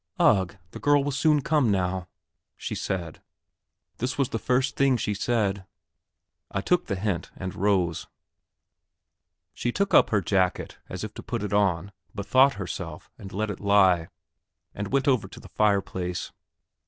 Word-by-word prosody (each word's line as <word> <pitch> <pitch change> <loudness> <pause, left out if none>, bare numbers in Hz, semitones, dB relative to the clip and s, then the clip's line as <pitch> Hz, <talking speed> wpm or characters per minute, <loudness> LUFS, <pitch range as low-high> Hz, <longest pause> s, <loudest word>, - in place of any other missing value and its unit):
"Ugh, 95 -2 +3
the - - -8
girl 145 -1 +3
will 145 - -1
soon 150 +2 +3
come 145 -4 +2
now!" 95 -2 0 0.5
she - - -5
said; 85 -5 -4 0.8
this 125 +2 -2
was 140 -3 +1
the 115 - -2
first 130 +3 +1
thing 135 -2 +3
she 105 -2 -1
said. 100 -2 0 0.9
I - - -2
took 180 - +1
the 100 - -1
hint, 95 -3 -2
and 95 -1 -5
rose. 95 -4 0 1.5
She 120 - -2
took 200 +9 -1
up - - +6
her 105 - +3
jacket 95 0 0
as - - -5
if - - -5
to - - -8
put - - -4
it 105 - -3
on, 100 -2 +1 0.2
bethought 130 +7 +4
herself, 90 -4 -6
and 95 - -9
let 105 +2 -2
it 95 - -7
lie, 95 -5 +4 0.7
and 100 0 -5
went 135 0 +1
over 130 -6 +2
to - - -12
the - - -13
fireplace. 95 -4 0
100 Hz, 160 wpm, -26 LUFS, 95-125 Hz, 1.5 s, up